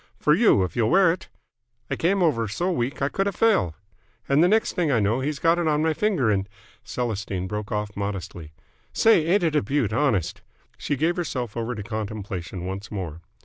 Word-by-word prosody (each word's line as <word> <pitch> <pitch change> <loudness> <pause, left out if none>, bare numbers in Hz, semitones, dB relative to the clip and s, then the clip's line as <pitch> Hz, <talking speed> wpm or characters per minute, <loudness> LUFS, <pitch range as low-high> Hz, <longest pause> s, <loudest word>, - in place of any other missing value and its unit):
'For - - +4
you, 95 - +4
if 90 - -4
you'll 115 -2 +2
wear 185 0 +5
it!' 180 +3 -6 0.6
I - - +1
came 185 +3 +1
over 115 -9 +1
so 175 - -1
weak, 135 -3 -2
I 140 - +2
could 195 +5 -1
have 200 - -2
fell! 105 - +2 0.5
And 140 +4 +4
the - - +5
next 220 +4 +2
thing 165 -5 0
I 120 - +3
know 105 +4 +1
he's 145 +2 -2
got 165 +3 +2
it 170 - 0
on 150 0 +2
my 160 0 +2
finger 170 - +1
and 100 -1 -1 0.2
" - - -30
Celestine 105 -6 -3
broke 105 +1 -5
off 105 -1 -3
modestly. 95 -6 -5 0.4
"Say, 220 -8 +4
ain't 185 +2 +3
it 160 -2 +1
a 150 - +4
beaut, 120 -2 -1
honest!" 110 - 0 0.4
She 145 - -1
gave 165 +6 0
herself 125 -10 -3
over 115 +1 -3
to 105 - -6
contemplation 100 -5 -5
once 95 +2 -5
more. 85 -6 -5
120 Hz, 210 wpm, -24 LUFS, 100-165 Hz, 0.6 s, wear